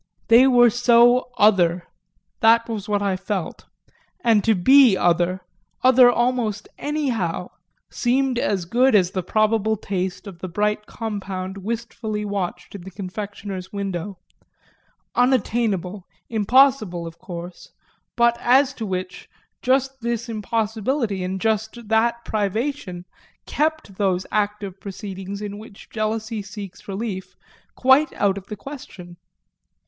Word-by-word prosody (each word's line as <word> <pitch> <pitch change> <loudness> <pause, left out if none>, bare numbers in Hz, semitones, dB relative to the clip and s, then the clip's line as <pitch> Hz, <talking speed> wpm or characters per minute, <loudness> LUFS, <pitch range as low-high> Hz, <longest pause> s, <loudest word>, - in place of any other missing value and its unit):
They 240 +3 +7
were 245 -2 +6
so 240 +1 +4
other 180 -4 +4 0.6
that 230 -1 +4
was 215 -3 -5
what 205 -1 +1
I 195 -2 +1
felt; 185 -1 -5 0.6
and 225 -4 +4
to 225 -1 +3
be 250 +2 +6
other, 175 +1 +1 0.4
other 255 -1 +7
almost 240 -4 -1
anyhow, 235 - -2 0.4
seemed 255 0 +1
as 190 -7 -1
good 245 +7 +3
as 185 -3 +3
the 190 - -2
probable 215 +3 +1
taste 190 -1 -4
of 190 -4 -10
the 185 - -5
bright 210 +4 -1
compound 195 -4 -5
wistfully 215 0 -4
watched 185 -3 -4
in 200 - -8
the 185 - -9
confectioner's 195 0 -7
window; 195 -1 -4 1.0
unattainable, 215 -7 0 0.2
impossible, 220 -5 +3
of 165 0 -10
course, 175 -1 -9 0.4
but 235 0 +4
as 265 +3 +4
to 225 -5 -5
which 185 0 -5 0.3
just 265 +1 +1
this 235 0 -2
impossibility 220 0 -2
and 190 +1 -3
just 220 +1 -2
that 235 +1 +1
privation 215 -2 -2 0.4
kept 310 -10 -2
those 185 -2 0
active 205 -2 -2
proceedings 195 0 -7
in 205 0 -6
which 215 -2 -14
jealousy 220 0 -2
seeks 195 -1 -10
relief 195 -1 -5 0.4
quite 265 +4 +4
out 200 -1 +1
of 195 - -19
the 210 - -6
question. 195 -9 -10
210 Hz, 125 wpm, -22 LUFS, 190-235 Hz, 1.0 s, They